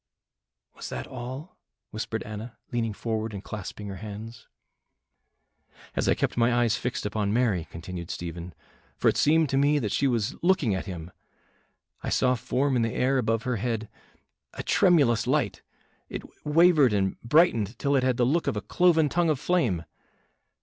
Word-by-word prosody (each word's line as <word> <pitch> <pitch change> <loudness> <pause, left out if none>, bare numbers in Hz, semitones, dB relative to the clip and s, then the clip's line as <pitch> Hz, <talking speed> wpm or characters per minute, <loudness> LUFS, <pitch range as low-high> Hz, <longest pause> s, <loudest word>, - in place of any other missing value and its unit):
"Was - - -7
that - - -5
all?" 130 +6 -8 0.3
whispered - - -4
Anna, 110 +1 -8
leaning 115 -2 -1
forward 110 0 -3
and 100 - -7
clasping 105 0 -7
her 100 -1 -6
hands. 110 +3 -8 1.5
"As - - +1
I - - +4
kept - - -1
my 120 +1 +4
eyes 120 -2 +2
fixed 125 - -3
upon 105 -1 -1
Mary," 105 -8 +1
continued 85 +1 -7
Stephen 85 0 -6 0.4
"for - - +3
it - - 0
seemed 160 +1 +4
to 135 - +1
me 145 +1 +3
that 110 -8 -1
she 140 - +2
was 120 +1 0
looking 175 - +2
at 95 - -3
Him 85 -2 -7 0.9
I - - -3
saw 125 -1 +3
form 130 +3 0
in 120 - +2
the 115 -1 -1
air 130 +1 +2
above 115 -1 0
her 125 -2 -1
head 110 0 -2 0.7
a - - -5
tremulous 145 - +3
light, - - 0 0.5
it - - -5 0.2
wavered 155 -5 +5
and 95 -2 0
brightened 120 - +3
till 140 0 +1
it 135 - +4
had 130 -1 +1
the 120 - +3
look 160 +7 +1
of - - 0
a - - -2
cloven 170 -4 +3
tongue 170 +2 +1
of 150 -4 +1
flame. 120 - +1
120 Hz, 170 wpm, -27 LUFS, 105-140 Hz, 1.5 s, wavered